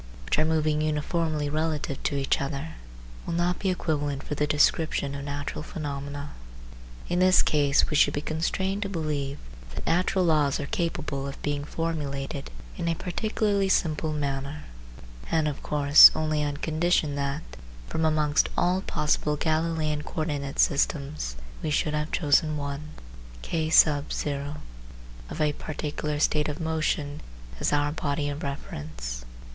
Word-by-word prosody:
which - - +1
are 155 - +4
moving 155 -1 +1
uniformly 155 0 0
relative 155 -2 -2
to 145 - -1
each 135 -1 +1
other, 140 +3 -3 0.5
will 170 - -3
not 175 +1 +1
be 195 - 0
equivalent 145 -6 -1
for - - -4
the 150 0 0
description 150 -1 +2
of 140 0 -5
natural 145 +1 -4
phenomena. 145 -2 -5 0.8
In 175 - 0
this 185 0 +6
case 145 -2 +3
we 150 - -2
should 145 0 +4
be - - 0
constrained 190 +6 -1
to 200 - -2
believe 150 -6 -2 0.4
that - - -6
natural 180 +2 +2
laws 150 -4 +2
are 145 - -3
capable 155 -4 -2
of 140 - -7
being 145 -1 -1
formulated 140 - -3 0.3
in 170 - -2
a 165 - +1
particularly 200 +2 0
simple 160 -3 +1
manner, 140 0 -3 0.7
and 160 -2 +2
of 145 - -3
course 145 0 +8
only 155 -1 0
on 145 -1 -2
condition 160 -1 +1
that, 140 +2 -2 0.4
from 160 - -2
amongst 155 -2 +2
all 180 +2 +2
possible 150 -3 0
Galileian 155 -1 0
co 160 - -4
ordinate 140 -3 -3
systems, 140 - +1 0.3
we 155 - -2
should 150 0 +1
have 150 +1 -2
chosen 155 0 +2
one 145 +1 -5 0.5
(K) 160 - -1 0.2
of 145 -1 -2 1.3
a 150 -1 +2
particular 150 0 -3
state 150 0 +2
of 150 - -5
motion 155 -2 -1 0.4
as - - +1
our 145 0 +2
body 145 -1 -1
of 145 +2 -5
reference. 75 - -6
150 Hz, 145 wpm, -27 LUFS, 145-160 Hz, 1.3 s, course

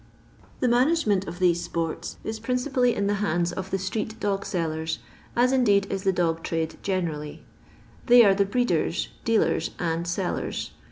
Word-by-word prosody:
The 255 - +3
management 240 - +2
of 170 - -6
these 175 -2 +2
sports 165 -2 -4
is 220 0 -4
principally 250 +1 +1
in 200 - 0
the 205 - +1
hands 175 -3 +1
of 190 +1 -5
the 195 - 0
street 210 +4 -3
dog 200 -1 -1
sellers, 160 -2 -2 0.4
as 245 +2 +4
indeed 205 -7 +4
is 195 - -2
the 190 - +4
dog 165 -3 0
trade 165 -1 -2
generally. 165 -6 -3 0.6
They 240 -1 +8
are 195 - +6
the 200 +1 +2
breeders, 245 +5 0 0.2
dealers, 230 -1 +2
and 170 0 -2
sellers. 175 +1 -2
195 Hz, 160 wpm, -25 LUFS, 170-230 Hz, 0.6 s, They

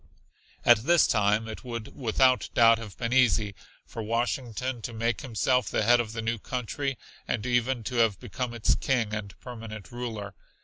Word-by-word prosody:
At 120 -2 +7
this 170 +8 +4
time 105 +1 +2
it 110 - -7
would 115 -3 -6
without 130 +1 +2
doubt 115 -1 +6
have 105 -5 -9
been 115 0 -2
easy 110 -5 +3 0.3
for 115 - -7
Washington 120 +2 -2
to 120 - -6
make 115 0 -1
himself 125 -3 +1
the - - 0
head 120 +3 +5
of 110 -2 -2
the 115 0 -4
new 115 0 -1
country, 130 +3 -3 0.3
and 115 -1 -2
even 120 0 +1
to 125 +3 -4
have 115 -5 +3
become 120 +1 -4
its 115 - +2
King 120 -5 0
and 105 -3 -6
permanent 110 -6 -9
ruler. 110 -5 -5
115 Hz, 175 wpm, -27 LUFS, 110-125 Hz, 0.3 s, At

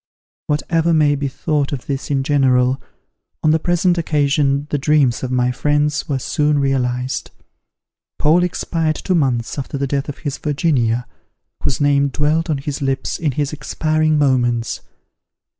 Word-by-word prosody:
Whatever 165 +2 +1
may 150 -2 +4
be 140 0 -1
thought 145 +1 -1
of 135 -3 -5
this 135 -1 -4
in 135 -2 +1
general, 130 -2 +2 0.6
on 155 - +4
the 160 - +3
present 175 +1 +1
occasion 145 -2 +1
the 145 - 0
dreams 140 -4 +2
of 130 - -3
my 125 -1 +1
friends 150 +4 0
were 140 - +1
soon 150 +3 0
realized. 130 -2 -1 0.9
Paul 160 +4 +4
expired 165 -2 -1
two 185 - -2
months 130 -6 0
after 140 +1 -4
the 140 - -1
death 140 +1 -2
of 145 - -6
his 145 - -3
Virginia, 135 -6 0 0.6
whose 130 - -1
name 140 -1 +3
dwelt 150 +4 0
on 150 - +1
his 140 +1 -5
lips 135 -1 -2
in 150 -5 0
his 145 +2 -2
expiring 155 +1 0
moments. 120 -5 +1
145 Hz, 155 wpm, -19 LUFS, 135-155 Hz, 0.9 s, may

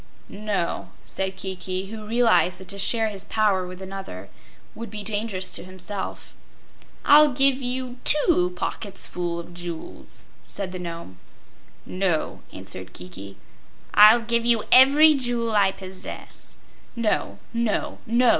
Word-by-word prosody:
"No," 205 -4 -3 0.2
said 190 0 -3
Kiki, 190 0 -4
who 215 -1 -8
realized 225 -6 +3
that 190 - -12
to 200 - -2
share 220 +3 +2
his 200 -2 -7
power 200 -4 +1
with 185 +1 -9
another 190 - -8 0.4
would 230 -1 -8
be 210 0 -6
dangerous 205 -2 -3
to - - -5
himself. 185 +2 -7 0.7
"I'll 295 0 +7
give 270 +1 +3
you 250 0 -4
TWO 295 - +4
pocketsful 180 -3 -3
of 170 +1 -10
jewels," 175 -2 -9 0.2
said 195 -2 -4
the 185 - -6
Nome. 170 - -8 0.7
"No," 185 -4 -1
answered 95 0 -8
Kiki. 95 +2 -9 0.6
"I'll 215 +3 +8
give 235 0 0
you 235 -2 +2
every 285 +4 +8
jewel 240 -4 -1
I 200 -2 +4
possess." 190 -1 -10 0.4
"No, 230 -3 -1 0.2
no, 230 -2 -1
no!" 235 +2 +4
200 Hz, 130 wpm, -24 LUFS, 185-235 Hz, 0.7 s, I'll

